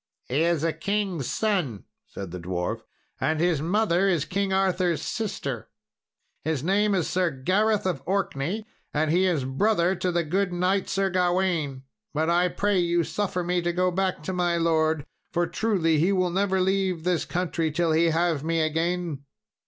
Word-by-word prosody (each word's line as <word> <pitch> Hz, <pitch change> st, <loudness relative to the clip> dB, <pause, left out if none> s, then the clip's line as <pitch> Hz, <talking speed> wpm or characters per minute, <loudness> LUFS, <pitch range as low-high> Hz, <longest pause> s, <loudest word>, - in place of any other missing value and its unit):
"He 135 Hz, +5 st, 0 dB
is 170 Hz, -2 st, +2 dB
a 165 Hz, -1 st, +1 dB
king's 190 Hz, -, -2 dB
son," 180 Hz, -, -1 dB, 0.2 s
said 95 Hz, -3 st, -7 dB
the 90 Hz, -, -6 dB
dwarf, 90 Hz, 0 st, -3 dB, 0.4 s
"and 155 Hz, 0 st, 0 dB
his 170 Hz, -3 st, +2 dB
mother 190 Hz, +1 st, +2 dB
is 165 Hz, -5 st, +1 dB
King 195 Hz, +2 st, -1 dB
Arthur's 185 Hz, -3 st, +1 dB
sister. 165 Hz, -, -4 dB, 0.7 s
His 155 Hz, -3 st, -1 dB
name 200 Hz, +3 st, +2 dB
is 180 Hz, -4 st, 0 dB
Sir 180 Hz, -1 st, +1 dB
Gareth 195 Hz, +10 st, +1 dB
of 175 Hz, -8 st, -1 dB
Orkney, 195 Hz, +1 st, -1 dB, 0.3 s
and 155 Hz, +1 st, +2 dB
he 180 Hz, +3 st, +3 dB
is 160 Hz, -7 st, +1 dB
brother 175 Hz, +6 st, +2 dB
to 185 Hz, -1 st, -1 dB
the 170 Hz, 0 st, +1 dB
good 185 Hz, +4 st, 0 dB
knight, 185 Hz, +2 st, 0 dB
Sir 195 Hz, 0 st, 0 dB
Gawain. 175 Hz, -7 st, 0 dB, 0.3 s
But 160 Hz, +2 st, +1 dB
I 175 Hz, +1 st, +3 dB
pray 200 Hz, +2 st, +1 dB
you 170 Hz, -1 st, +2 dB
suffer 185 Hz, +1 st, -2 dB
me 175 Hz, 0 st, 0 dB
to 175 Hz, 0 st, 0 dB
go 180 Hz, +1 st, +1 dB
back 185 Hz, -3 st, -1 dB
to 185 Hz, -, -3 dB
my 175 Hz, -1 st, +1 dB
lord, 160 Hz, -2 st, +1 dB, 0.3 s
for 175 Hz, 0 st, +1 dB
truly 170 Hz, -7 st, +1 dB
he 175 Hz, +5 st, +3 dB
will 185 Hz, -2 st, +1 dB
never 190 Hz, +1 st, +1 dB
leave 190 Hz, -2 st, +1 dB
this 180 Hz, -1 st, +1 dB
country 170 Hz, -2 st, -1 dB
till 165 Hz, +1 st, +1 dB
he 160 Hz, +2 st, +4 dB
have 165 Hz, -2 st, +1 dB
me 165 Hz, +1 st, 0 dB
again." 165 Hz, -1 st, -1 dB
175 Hz, 175 wpm, -26 LUFS, 160-190 Hz, 0.7 s, he